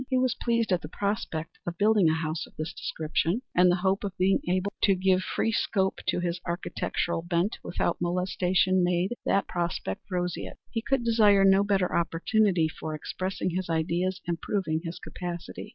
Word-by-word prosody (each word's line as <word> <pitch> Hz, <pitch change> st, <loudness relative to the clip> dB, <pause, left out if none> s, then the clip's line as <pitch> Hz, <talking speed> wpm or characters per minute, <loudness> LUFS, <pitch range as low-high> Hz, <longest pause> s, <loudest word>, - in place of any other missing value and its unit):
He 260 Hz, -, +2 dB
was 255 Hz, -2 st, +2 dB
pleased 235 Hz, -3 st, 0 dB
at 180 Hz, -1 st, +2 dB
the 150 Hz, -, -6 dB
prospect 195 Hz, -5 st, -3 dB
of 170 Hz, -1 st, -3 dB
building 205 Hz, -4 st, +4 dB
a 160 Hz, -, +2 dB
house 160 Hz, 0 st, -3 dB
of -, -, -21 dB
this 155 Hz, +2 st, -4 dB
description, 165 Hz, +8 st, -1 dB
and 180 Hz, 0 st, +5 dB
the 175 Hz, -, +4 dB
hope 190 Hz, +2 st, +2 dB
of 195 Hz, -1 st, -4 dB
being 190 Hz, +1 st, +3 dB
able 185 Hz, +2 st, 0 dB
to 195 Hz, -, +4 dB
give 185 Hz, 0 st, +2 dB
free 225 Hz, -, -1 dB
scope 190 Hz, -3 st, 0 dB
to -, -, +1 dB
his 175 Hz, 0 st, -2 dB
architectural 170 Hz, -1 st, -2 dB
bent 175 Hz, +4 st, -1 dB
without -, -, -1 dB
molestation 180 Hz, +1 st, +2 dB
made 180 Hz, +4 st, +1 dB
that 195 Hz, -, +2 dB
prospect 170 Hz, -, -3 dB
roseate. 180 Hz, -2 st, -3 dB
He 225 Hz, -, -1 dB
could 265 Hz, +1 st, 0 dB
desire 210 Hz, -4 st, +5 dB
no 195 Hz, +1 st, +6 dB
better 195 Hz, -3 st, +1 dB
opportunity 170 Hz, +1 st, +2 dB
for 155 Hz, 0 st, -5 dB
expressing 185 Hz, +4 st, -3 dB
his 185 Hz, 0 st, -3 dB
ideas 170 Hz, +3 st, 0 dB
and 170 Hz, -1 st, -2 dB
proving 165 Hz, -6 st, -1 dB
his 165 Hz, 0 st, -5 dB
capacity. 175 Hz, -2 st, -7 dB
180 Hz, 180 wpm, -27 LUFS, 170-200 Hz, -, no